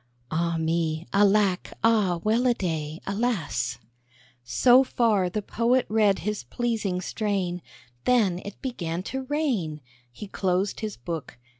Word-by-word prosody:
(Alas! 165 0 0
Alack! 200 -2 +3
Ah, 210 -6 +3
well 230 +4 +2
a 240 - +3
day! 160 -4 -3
Ah 195 - -2
me!) 220 - -1 0.7
So 250 - +5
far 215 -8 +2
the 210 +3 -3
Poet 240 +5 +1
read 210 -2 +3
his 210 -6 -2
pleasing 215 - -2
strain, 190 -4 -2 0.4
Then 210 -8 +3
it 200 - -9
began 175 -9 -3
to 265 0 -3
rain: 250 - -1 0.3
He 210 - -8
closed 190 0 -1
his 215 -1 -4
book. 160 +3 -6
200 Hz, 130 wpm, -26 LUFS, 170-230 Hz, 0.7 s, So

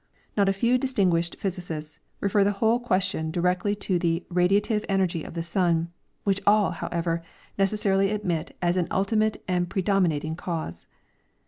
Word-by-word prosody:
• - - -44 0.3
Not 200 -2 +3
a - - +4
few 235 +6 +2
distinguished 185 -10 +1
pliA^sicists 170 -5 -5 0.2
refer 200 0 +3
the 205 +1 +2
whole 225 +4 +2
question 185 -8 0
directly 180 +5 0
to 185 -3 +1
the 170 0 0
radiative 205 +4 +2
energy 185 -5 +1
of - - -9
the 165 - -2
sun, 170 -1 +1 0.3
which 200 -1 +1
all, 205 -1 +5
however, 170 -1 -2 0.3
necessarily 195 -1 +2
admit 190 -6 -2
as 175 +1 +2
an 175 -2 +1
ultimate 215 +2 +1
and 180 -1 0
predominating 175 -5 +1
cause. 160 - -5
185 Hz, 150 wpm, -26 LUFS, 170-200 Hz, 0.3 s, all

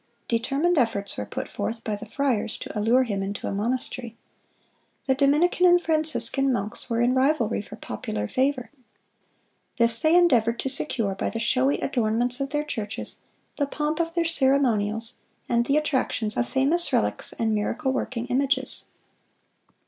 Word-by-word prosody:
Determined 275 +8 +1
efforts 200 -5 0
were - - -5
put - - -5
forth 230 0 -4
by 215 - -2
the 220 +2 -9
friars 240 -3 -1
to - - -8
allure 230 +5 +3
him 205 -5 -3
into 200 +1 -4
a - - -2
monastery. 235 +2 -3 0.9
The 265 - +3
Dominican 300 +7 +3
and 355 0 +6
Franciscan 310 -4 +2
monks 215 +1 -3
were 230 0 0
in 245 +1 +3
rivalry 260 -5 +1
for - - -11
popular 105 -1 -5
favor. 260 - -1 1.1
This 230 -1 +4
they 315 +2 +3
endeavored 240 -10 +4
to 270 - -2
secure 240 -6 -1
by 190 - -2
the 230 - -5
showy 255 +4 +1
adornments 240 0 0
of 275 0 -2
their 295 +1 -1
churches, 220 -8 -5 0.4
the 285 - 0
pomp 300 +3 -2
of 335 0 -1
their 340 -1 +1
ceremonials, 250 -7 +1 0.3
and 235 0 +1
the 280 - +3
attractions 260 -7 -1
of 240 - -1
famous 300 +6 +1
relics - - 0
and 225 -1 -1
miracle 260 +6 -1
working 250 -2 -3
images. 265 +1 -1
255 Hz, 155 wpm, -25 LUFS, 225-285 Hz, 1.1 s, and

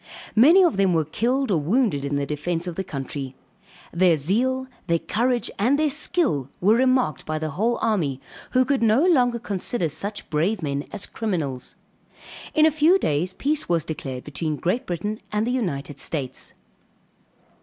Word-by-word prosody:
Many 320 - +7
of 335 - +2
them 190 -3 +3
were 160 -1 +2
killed 245 - 0
or 170 - +3
wounded 185 - +1
in 140 0 -2
the 140 0 0
defence 165 +4 -2
of 175 - -4
the 190 - -3
country. 135 -3 -6 0.6
Their 170 -2 +4
zeal, 250 - 0 0.2
their 170 -1 +3
courage, 240 +7 -1
and 250 +8 +3
their 305 -1 +2
skill, 275 - 0
were 200 +4 +4
remarked 255 - +2
by 155 0 -3
the 155 0 -3
whole 220 +10 0
army, 165 - 0 0.3
who 255 0 +4
could 275 -2 +1
no 230 +7 +4
longer 250 -9 +3
consider 200 -4 -2
such 200 +7 -4
brave 170 +6 0
men 140 -1 -2
as 210 - -3
criminals. 155 - -3 0.8
In 310 -1 +6
a 315 - +5
few 315 +5 +4
days 175 - -1
peace 295 +1 -1
was 170 -3 +2
declared 135 -5 -5
between 155 +1 -3
Great 190 - -1
Britain 205 +5 -3
and 210 0 0
the 245 - -1
United 145 - -3
States. 135 -3 -4
195 Hz, 170 wpm, -23 LUFS, 155-250 Hz, 0.8 s, Many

